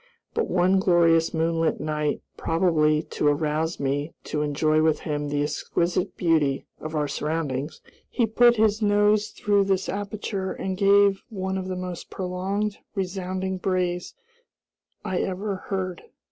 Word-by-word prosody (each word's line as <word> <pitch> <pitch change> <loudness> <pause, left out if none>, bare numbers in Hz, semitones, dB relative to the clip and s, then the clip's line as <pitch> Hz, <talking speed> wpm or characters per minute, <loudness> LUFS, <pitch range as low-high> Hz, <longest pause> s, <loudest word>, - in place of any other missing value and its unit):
But 455 -1 -1
one 185 +1 +3
glorious 170 -3 +4
moonlight 165 0 0
night, 150 -1 -2
probably 160 -2 +2
to 150 - -1
arouse 155 +2 0
me 145 +3 -2
to 150 - -2
enjoy 155 +1 +2
with 160 -1 +2
him 145 -1 -2
the 145 0 0
exquisite 175 +5 -1
beauty 155 -6 +2
of 155 +1 -6
our 150 -1 +1
surroundings, 150 -1 -3 0.3
he 235 - +1
put 240 +2 +5
his 215 -1 +2
nose 210 0 +3
through 205 -2 +1
this 190 -1 0
aperture 200 -1 -3
and 190 0 -3
gave 200 0 +4
one 190 -3 -3
of 190 -1 -3
the 185 - -3
most 180 -1 -6
prolonged, 195 +3 -2 0.2
resounding 190 0 -3
brays 180 -1 -1 0.9
I 185 - -1
ever 195 +1 -2
heard. 185 -3 -3
180 Hz, 140 wpm, -25 LUFS, 155-195 Hz, 0.9 s, put